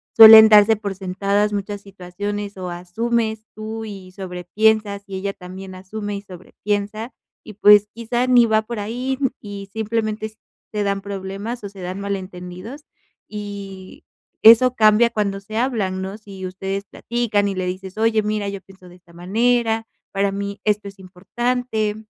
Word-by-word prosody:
suelen 220 -1 +11
darse 210 +1 +7
por 205 -2 -5
sentadas 200 +2 0
muchas 205 0 -3
situaciones 200 +1 -6
o 185 -1 -5
asumes 220 +5 -2
tú 220 +1 -6
y 195 -3 -9
sobre 185 -2 -7
piensas, 210 +1 +1
y 195 - -6
ella 195 +1 -2
también 185 +1 -10
asume 205 +2 -5
y - - -7
sobre 185 -3 -14
piensa, 210 +3 -2 0.3
y 215 - -10
pues 210 0 +6
quizá 240 +2 -1
ni 245 -2 +6
va 220 -1 +2
por 230 0 -5
ahí, 250 +6 -3 0.2
y 200 -1 -8
simplemente 220 -1 -3 0.4
te 210 -1 0
dan 200 -1 0
problemas 200 +4 -6
o 200 - -5
se 195 0 -14
dan 185 +2 -5
malentendidos, 190 +5 -6 0.5
y 200 -2 -8 0.4
eso 235 +3 +7
cambia 215 +1 +5
cuando 200 -3 -2
se 210 +2 -10
hablan, 215 -7 -1
¿no? 190 +2 -5
Si 195 -3 -9
ustedes 195 +2 -4
platican 225 -3 -1
y 195 - -2
le 185 0 -2
dices: 185 +2 -6
"Oye, 220 0 +2
mira, 210 -1 -2
yo 200 0 -5
pienso 190 -1 -17
de 175 - -15
esta 170 -1 -23
manera, 225 +5 +1 0.2
para 200 0 0
mí 200 +1 -4
esto 210 -1 +1
es 195 0 -17
importante, 215 +4 -2
205 Hz, 165 wpm, -21 LUFS, 195-220 Hz, 0.5 s, suelen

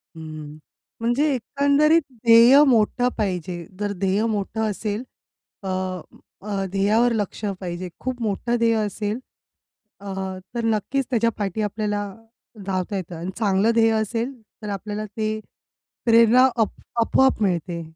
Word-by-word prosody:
हं. 155 -2 -8 0.4
म्हणजे 240 +5 +1
एकंदरीत 285 +6 +3 0.2
ध्येय 235 +5 +8
मोठं 245 0 +3
पाहिजे. 180 -4 -3
जर 205 -1 -1
ध्येय 195 +3 +2
मोठं 220 0 -2
असेल 210 +3 -3 0.6
अ, - - -5 0.7
अ, 200 -1 -3
ध्येयावर 210 +5 +3
लक्ष 210 -1 -3 0.2
पाहिजे. 180 0 -5
खूप 255 -1 -4
मोठं 225 +2 -1
ध्येय 230 -1 +3
असेल, 210 +1 -2 0.8
अ, - - -12 0.5
तर 235 - -1
नक्कीच 225 +5 0
त्याच्या 230 -2 +2
पाठी 205 0 -2
आपल्याला 210 0 -1 0.6
धावता 190 +1 -2
येतं 180 -2 -6
अन् 175 +3 -4
चांगलं 205 0 +3
ध्येय 225 -1 +4
असेल. 230 +4 -2 0.3
तर 210 - -4
आपल्याला 210 +2 -4
ते, 215 +1 -3 0.7
प्रेरणा 230 +2 +6
अप 225 -2 +1 0.3
आपोआप 265 0 +3
मिळते. 175 -3 -1
215 Hz, 125 wpm, -23 LUFS, 195-230 Hz, 0.8 s, ध्येय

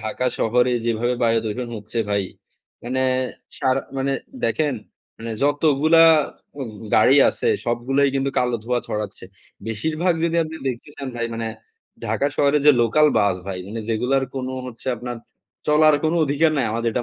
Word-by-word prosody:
ঢাকা 110 +3 -2
শহরে 125 +2 +2
যেভাবে 120 +1 0
বায়ু 115 -1 +3
দূষণ 120 +3 -3
হচ্ছে 105 +3 -6
ভাই, 100 -1 +1 0.6
মানে 130 +2 -1 0.6
সারা 130 +1 +1 0.2
মানে 135 +1 0 0.3
দেখেন 150 -4 +1 0.4
মানে 115 0 -6
যতগুলা 150 +2 +4 0.6
উ - - -2 0.3
গাড়ি 130 +5 +6
আছে, - - -1 0.2
সবগুলাই 130 +4 +1
কিন্তু 135 0 0
কালো 125 -1 +1
ধোঁয়া 120 +1 0
ছড়াচ্ছে। 105 -3 -4 0.4
বেশিরভাগ 155 - 0
যদি 170 0 0
আপনি 160 0 -6
দেখতে 125 +2 -5
চান 135 -2 -5
ভাই 115 0 -1
মানে 115 0 -3 0.6
ঢাকা 140 - 0
শহরে 145 +1 +3
যে - - +10
লোকাল 150 +7 +4
বাস 100 -3 +2
ভাই 95 -2 -4
মানে 115 +2 -5
যেগুলার 125 +4 +1
কোনো 130 -1 -3
হচ্ছে 120 -1 -11
আপনার 120 +1 -6 0.5
চলার 155 0 +5
কোন 155 - +2
অধিকার 150 +3 +2
নাই। 135 - +1
আমার 115 +1 -2
যেটা 120 +2 -1
125 Hz, 160 wpm, -22 LUFS, 115-145 Hz, 0.6 s, যে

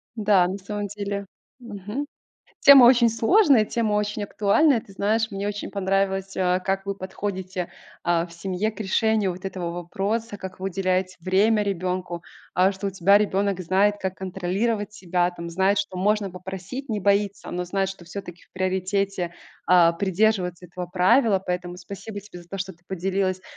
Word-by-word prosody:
Да. 205 -4 +4
На 190 +2 -3
самом 205 +1 -4
деле. 200 0 -4 0.3
Мгм. 220 +4 -5 0.6
Тема 275 -3 +9
очень 240 -2 +6
сложная, 245 - +4
тема 225 -3 0
очень 210 0 -1
актуальная. 225 +6 +3
Ты 195 - -16
знаешь, 220 +3 +1
мне 200 +1 -4
очень 205 0 -4
понравилось, 195 0 0
а, 180 0 +1
как 195 +1 -2
вы 200 - -1
подходите, 190 -1 -5 0.3
а, 170 -1 +2
в 170 - -16
семье 190 +4 -2
к 220 - -14
решению 210 -1 +1
вот 185 +2 -11
этого 180 -3 -3
вопроса, 200 +5 -3
как 185 -1 -8
вы 190 - -2
уделяете 185 0 0
время 210 +4 +3
ребёнку. 180 -3 -3 0.3
А, 185 +2 +4
что 195 +1 -5
у - - 0
тебя 195 +2 +4
ребёнок 200 -2 0
знает, 195 +4 +2
как 190 -1 -2
контролировать 195 +3 -2
себя, 180 -2 0
там, 170 -1 -7
знает, 190 +3 +2
что 185 -2 -3
можно 205 0 +1
попросить, 190 +9 -7
не 210 -2 -2
боится, 200 0 +1
но 180 0 -2
знает, 195 +1 -1
что 180 -3 -11
всё-таки 180 -2 -8
в - - -37
приоритете, 185 -1 -1 0.3
а, 175 -2 +6
придерживаться 190 -1 0
этого 180 +1 -6
правила. 195 +3 +3
Поэтому 180 0 -3
спасибо 200 +2 -8
тебе 185 -3 -12
за 175 - -17
то, 195 - -5
что 190 0 -4
ты 175 +1 -26
поделилась 190 0 -1
195 Hz, 170 wpm, -24 LUFS, 185-205 Hz, 0.6 s, Тема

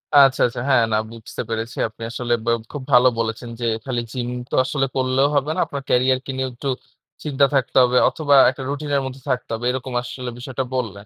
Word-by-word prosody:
আচ্ছা, 135 -2 +6
আচ্ছা। 120 - -5
হ্যাঁ 130 -4 +5
না, - - +4
বুঝতে 115 -1 -7
পেরেছি। 115 +1 -4
আপনি 110 +1 -11
আসলে 120 0 -1
ব - - -12 0.2
খুব 145 - -5
ভালো 125 +1 +7
বলেছেন 115 +1 -3
যে, 120 - -2 0.2
খালি 120 -3 -1
জিম 125 -2 -3 0.2
তো - - -2
আসলে 135 0 0
করলেও 130 +1 +2
হবে 140 +2 +1
না। - - -2
আপনার 140 -1 -6
ক্যারিয়ারকে 130 +2 +2
নিয়েও 130 0 -1
একটু 135 +3 -4 0.5
চিন্তা 140 -2 +3
থাকতে 130 -1 +1
হবে, 125 0 +3
অথবা 145 -3 +2
একটা 130 +1 -6
রুটিন 145 +1 -4
এর 140 - +2
মধ্যে 130 0 -7
থাকতে 125 -1 -1
হবে। 115 +2 -3
এরকম 130 0 -5
আসলে 125 0 -6
বিষয়টা 130 +1 -3
বললেন। 105 -5 -3
130 Hz, 205 wpm, -21 LUFS, 120-135 Hz, 0.5 s, ভালো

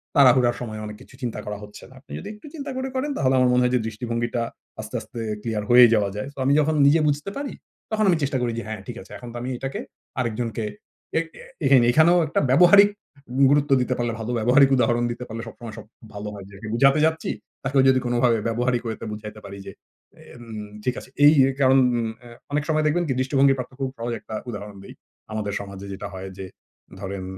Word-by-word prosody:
তাড়াহুড়ার 125 -3 +5
সময় 110 -3 -5
অনেক 105 0 -7
কিছু - - -16
চিন্তা 120 -3 -3
করা 105 0 -4
হচ্ছে 105 0 -12
না। 130 - -17
আপনি 140 - -20
যদি 200 - -8
একটু 210 +7 -13
চিন্তা 285 -2 -5
করে 260 0 -2
করেন 275 +3 -1
তাহলে 130 0 +2
আমার 125 -1 +4
মনে 125 - +4
হয় 125 - +2
যে, - - +3
দৃষ্টিভঙ্গিটা 115 +2 -2 0.4
আস্তে, - - -8
আস্তে 120 - -9 0.2
ক্লিয়ার 110 -2 -2
হয়ে 125 0 +10
যাওয়া 105 -3 +2
যায়। 105 - -4
সো - - -40
আমি 140 - +4
যখন 155 +1 +2
নিজে 150 +3 +5
বুঝতে 145 +5 -2
পারি 280 -2 -4 0.4
তখন 215 -1 +2
আমি 175 - +4
চেষ্টা 135 -1 0
করি 120 -1 0
যে, 115 - -3
হ্যাঁ, 110 -1 -5
ঠিক 120 - -6
আছে। - - -16
এখন 120 - -10
তো - - -6
আমি 125 - -4
এটাকে 135 +2 -4 0.4
আরেকজনকে 115 -1 -2 0.5
এ্যাক 165 0 +1 0.6
এখানেও 165 +6 +5
একটা 155 - 0
ব্যবহারিক 180 +8 +7 0.6
গুরুত্ব 145 0 +2
দিতে 125 - 0
পারলে 120 -1 -1
ভালো 110 +2 -4
ব্যবহারিক 130 +5 +5
উদাহরণ 120 -1 +2
দিতে 120 +1 -6
পারলে 115 0 -6
সবসময় 115 -1 -9
সব 110 - -9 0.3
ভালো 105 0 -6
হয়। 100 -2 -9
যাকে 100 +2 -10
বোঝাতে 135 +5 +4
যাচ্ছি 160 0 -1 0.3
তাকেও 135 0 +3
যদি 130 0 +4
কোনোভাবে 120 -1 +2
ব্যবহারিক 120 +1 0
way 110 - -2
তে - - -5
বুঝাইতে 105 0 -8
পারি 100 0 -8
যে, 100 - -7 0.6
এন 120 - -12 0.4
ঠিক 125 +1 0
আছে - - -14 0.2
এই, 150 - +8 0.2
এই - - -2
কারণ 135 0 +6 0.5
আ - - -11 0.2
অনেক 145 0 0
সময় 155 0 +2
দেখবেন 165 +4 +2 0.2
দৃষ্টিভঙ্গি 135 +1 +3
প্রাপ্ত 125 0 -5
খুব 135 -1 -1
সহজ 120 +1 -3
একটা 110 - -8
উদাহরণ 105 -2 -7
দেই। - - -11 0.4
আমাদের 105 -2 -3
সমাজে 100 -1 -8
যেটা 100 +1 -6
হয় 95 0 -6
যে, 95 - -6 0.5
ধরেন 95 -1 -5
120 Hz, 210 wpm, -24 LUFS, 110-140 Hz, 0.6 s, হয়ে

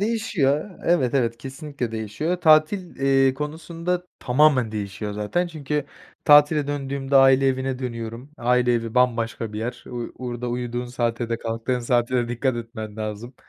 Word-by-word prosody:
değişiyor 205 -7 0
Evet, 140 -7 +2
evet, 115 -3 +1
kesinlikle 135 -3 -6
değişiyor. 110 - -2
Tatil, 160 +4 +3
eee, 135 -1 +3
konusunda 165 +4 -3
tamamen 130 -3 +3
değişiyor 105 0 -4
zaten 105 +13 -1
çünkü 150 -3 -3 0.4
tatile 145 0 +6
döndüğümde 140 -1 -1
aile 135 0 +6
evine 130 0 0
dönüyorum. 120 +1 -6
Aile 125 -1 +2
evi 115 0 -2
bambaşka 115 -3 +1
bir 105 - -4
yer. 120 +2 -5
U 120 -1 -6
orada 125 -1 -4
uyuduğun 120 0 -3
saate 120 -1 -2
de 115 0 -1
kalktığın 115 +2 -2
saate 120 +1 +1
de 120 -1 0
dikkat 120 +1 0
etmen 110 -2 -7
lazım. 110 +3 -5
125 Hz, 145 wpm, -23 LUFS, 115-145 Hz, 0.4 s, tatile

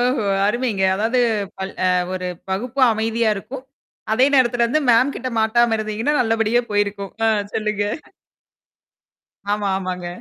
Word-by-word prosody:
ஓஹோ! 245 -2 +1 0.2
அருமைங்க. 230 -3 -1
அதாவது 230 +5 +1 0.4
பல 190 0 -3 0.2
அ - - +3 0.3
ஒரு 185 0 -4 0.2
வகுப்பும் 250 +7 +1
அமைதியாக 220 0 0
இருக்கும், 250 +7 -8 0.5
அதே 255 +4 +4
நேரத்திலே 245 -2 +3
வந்து 310 +5 +1
மேம் 255 +4 +3
கிட்ட 255 0 -4
மாட்டாம 225 +1 +3
இருந்தீங்கன்னா, 215 +6 -1
நல்லபடியா 225 +1 +1
போயிருக்கும். 200 -1 -1
அ - - +4 0.3
சொல்லுங்க. 210 -1 -1 1.7
ஆமா, 205 -1 -1
ஆமாங்க. 180 -2 -5
225 Hz, 130 wpm, -20 LUFS, 205-245 Hz, 1.7 s, அதே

